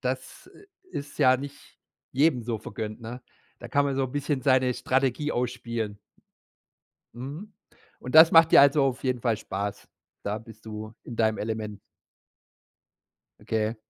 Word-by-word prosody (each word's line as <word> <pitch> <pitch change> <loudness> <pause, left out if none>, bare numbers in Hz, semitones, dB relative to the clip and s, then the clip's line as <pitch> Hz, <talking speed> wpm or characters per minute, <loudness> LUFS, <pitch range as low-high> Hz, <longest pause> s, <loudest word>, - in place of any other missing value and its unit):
Das, - - -5
äh, 405 - -17 0.3
ist 140 0 -6
ja 130 -2 +6
nicht 140 +2 -10 0.3
jedem 135 -2 +3
so 115 -1 -3
vergönnt, 110 +1 -6
ne? 120 +2 -8 0.4
Da 120 - -8
kann 140 +3 +2
man 140 - -1
so 135 - 0
'n 125 - -5
bisschen 145 -1 -1
seine 130 -2 +3
Strategie 135 +3 0
ausspielen. 115 -4 -3 1.2
Mhm. 145 - -8 0.5
Und 125 +4 -5
das 160 +1 +9
macht 165 0 +7
dir - - +9
also 140 +1 +5
auf 135 -1 -1
jeden 125 -2 -1
Fall 115 -4 +1
Spaß? 100 -1 -5 0.4
Da 105 +1 -2
bist 110 -1 -14
du 110 0 -7
in 120 - -8
deinem 110 -1 +2
Element. 110 -1 -4 1.6
Okay. 110 0 -1
125 Hz, 150 wpm, -27 LUFS, 110-140 Hz, 1.6 s, das